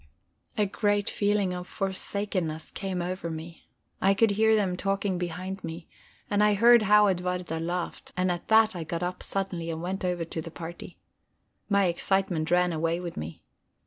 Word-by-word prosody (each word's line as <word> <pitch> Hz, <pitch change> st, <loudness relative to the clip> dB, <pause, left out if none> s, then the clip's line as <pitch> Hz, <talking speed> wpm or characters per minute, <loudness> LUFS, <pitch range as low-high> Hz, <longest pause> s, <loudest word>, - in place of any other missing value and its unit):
A 210 Hz, -, +3 dB
great 205 Hz, +1 st, 0 dB
feeling 205 Hz, -2 st, +1 dB
of 180 Hz, 0 st, -6 dB
forsakenness 190 Hz, -4 st, -2 dB
came 185 Hz, -3 st, -3 dB
over 180 Hz, -1 st, -3 dB
me. 165 Hz, +1 st, -8 dB, 0.3 s
I 195 Hz, +1 st, +4 dB
could 225 Hz, +1 st, +4 dB
hear 220 Hz, +2 st, +4 dB
them 195 Hz, -4 st, +1 dB
talking 195 Hz, -1 st, -1 dB
behind 180 Hz, +2 st, -4 dB
me, 165 Hz, +1 st, -6 dB, 0.4 s
and 205 Hz, 0 st, +2 dB
I 210 Hz, -1 st, +4 dB
heard 235 Hz, +3 st, +7 dB
how 210 Hz, 0 st, +6 dB
Edwarda 180 Hz, -3 st, -1 dB
laughed; 175 Hz, +2 st, -4 dB
and 185 Hz, 0 st, +2 dB
at 175 Hz, -1 st, -4 dB
that 220 Hz, -1 st, +5 dB
I 170 Hz, -, -3 dB
got 165 Hz, +2 st, -3 dB
up 180 Hz, +1 st, -3 dB
suddenly 180 Hz, -4 st, -3 dB
and 160 Hz, -1 st, -3 dB
went 190 Hz, +2 st, -3 dB
over 180 Hz, -2 st, -1 dB
to 160 Hz, 0 st, -4 dB
the 165 Hz, -, -7 dB
party. 170 Hz, +1 st, -9 dB, 0.7 s
My 200 Hz, -1 st, +4 dB
excitement 175 Hz, -2 st, 0 dB
ran 180 Hz, 0 st, +3 dB
away 165 Hz, +2 st, 0 dB
with 175 Hz, -1 st, -6 dB
me. 80 Hz, +1 st, -7 dB
180 Hz, 175 wpm, -27 LUFS, 170-200 Hz, 0.7 s, heard